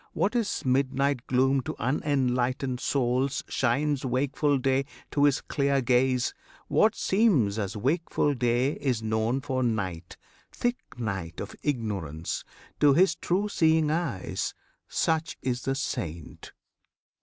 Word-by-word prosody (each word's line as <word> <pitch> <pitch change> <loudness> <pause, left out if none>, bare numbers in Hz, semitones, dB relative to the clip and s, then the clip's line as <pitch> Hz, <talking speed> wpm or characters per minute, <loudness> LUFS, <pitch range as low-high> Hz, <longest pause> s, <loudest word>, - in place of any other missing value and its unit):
What 215 +5 0
is 230 - -1
midnight 135 0 +1
gloom 130 +1 +3
To - - -5
unenlightened 130 -1 0
souls 130 0 0
shines 140 +3 0
wakeful 140 +3 +1
day 135 +1 +1 0.3
To 145 0 +3
his 145 -1 +3
clear 140 -1 +1
gaze; 125 0 +2 0.3
what 220 0 +3
seems 160 - +2
as 100 +1 -3
wakeful 145 - +1
day 125 +1 +1
Is 125 -5 -1
known 110 +4 0
for 130 -2 -2
night, 95 -8 -2 0.3
thick 245 0 -1 0.2
night 95 -8 -4
of - - -6
ignorance, 100 - -3 0.4
To 145 -2 +5
his 180 0 +5
true 190 +5 -1
seeing 160 -5 +3
eyes. 160 - -2 0.3
Such 160 0 0
is 125 -1 -1
the 135 - 0
Saint! 85 - -5
130 Hz, 125 wpm, -27 LUFS, 120-145 Hz, 0.4 s, To